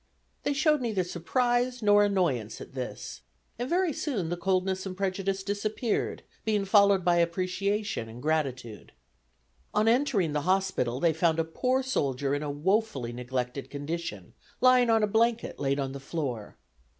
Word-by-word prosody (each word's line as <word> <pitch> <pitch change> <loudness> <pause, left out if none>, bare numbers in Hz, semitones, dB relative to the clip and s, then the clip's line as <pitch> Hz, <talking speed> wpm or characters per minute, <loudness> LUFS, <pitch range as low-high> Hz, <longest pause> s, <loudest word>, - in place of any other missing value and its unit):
They 290 - 0
showed 300 0 +2
neither 215 -6 0
surprise 245 +8 0
nor 205 0 +6
annoyance 170 - 0
at - - -10
this, 130 -2 -6 0.4
and 245 +2 -2
very 355 -2 +2
soon 215 - -2
the 175 - -1
coldness 190 +1 0
and 185 -1 -7
prejudice 195 0 -1
disappeared, 210 +3 -2 0.2
being 210 -2 +1
followed 200 -2 +4
by 175 -1 +4
appreciation 185 - -1
and 115 +2 -10
gratitude. 130 -7 -2 0.8
On 215 +1 +3
entering 225 - +2
the 150 - 0
hospital 185 -9 0
they 165 +1 +3
found 160 0 +2
a 165 - +2
poor 255 +11 0
soldier 140 - -1
in 145 - -1
a 150 - -3
woefully 145 - 0
neglected 125 +2 -4
condition, 145 - -5 0.3
lying 255 -1 +5
on 225 -1 +4
a - - +6
blanket 230 +2 +1
laid 140 0 0
on 135 -1 -2
the 140 - -7
floor. 135 -7 -4
185 Hz, 155 wpm, -28 LUFS, 145-215 Hz, 0.8 s, nor